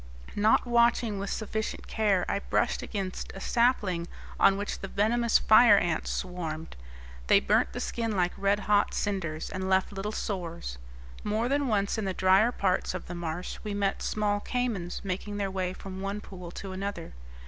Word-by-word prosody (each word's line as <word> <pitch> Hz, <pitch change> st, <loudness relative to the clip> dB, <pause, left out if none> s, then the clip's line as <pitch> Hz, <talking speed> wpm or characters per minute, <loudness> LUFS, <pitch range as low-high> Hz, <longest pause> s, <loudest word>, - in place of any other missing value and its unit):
Not 215 Hz, +4 st, +4 dB
watching 235 Hz, -3 st, +2 dB
with 200 Hz, 0 st, -3 dB
sufficient 220 Hz, 0 st, -3 dB
care 205 Hz, -5 st, +1 dB
I 200 Hz, -, 0 dB
brushed -, -, 0 dB
against 195 Hz, -3 st, -4 dB
a -, -, -6 dB
sapling 195 Hz, -7 st, +1 dB, 0.3 s
on 195 Hz, -, +5 dB
which 205 Hz, +1 st, -3 dB
the 195 Hz, -, -5 dB
venomous 230 Hz, +4 st, +2 dB
fire 215 Hz, -1 st, +7 dB
ants 170 Hz, -4 st, 0 dB
swarmed. 165 Hz, -3 st, -4 dB, 0.5 s
They -, -, +6 dB
burnt -, -, +2 dB
the -, -, -4 dB
skin 230 Hz, -3 st, -2 dB
like 180 Hz, -1 st, +2 dB
red 200 Hz, +1 st, +1 dB
hot 205 Hz, 0 st, +2 dB
cinders, 170 Hz, -6 st, -2 dB
and 190 Hz, 0 st, -3 dB
left 190 Hz, +1 st, +2 dB
little 200 Hz, +2 st, -3 dB
sores. 170 Hz, -, -4 dB, 0.4 s
More 215 Hz, +3 st, 0 dB
than 280 Hz, +1 st, +1 dB
once 205 Hz, -1 st, +1 dB
in 215 Hz, -, -2 dB
the 190 Hz, -1 st, -2 dB
drier 190 Hz, +5 st, +4 dB
parts 185 Hz, -5 st, 0 dB
of 185 Hz, -, -5 dB
the 175 Hz, -, -7 dB
marsh 175 Hz, 0 st, -4 dB
we 210 Hz, -2 st, -3 dB
met 200 Hz, -1 st, 0 dB
small 205 Hz, -1 st, 0 dB
caymans 215 Hz, -7 st, -2 dB
making 200 Hz, +2 st, -4 dB
their 200 Hz, -1 st, -1 dB
way 185 Hz, -1 st, -1 dB
from 190 Hz, 0 st, -8 dB
one 200 Hz, +1 st, -3 dB
pool 180 Hz, -4 st, -9 dB
to 190 Hz, +2 st, -7 dB
another. 190 Hz, -2 st, -5 dB
200 Hz, 175 wpm, -28 LUFS, 185-215 Hz, 0.5 s, fire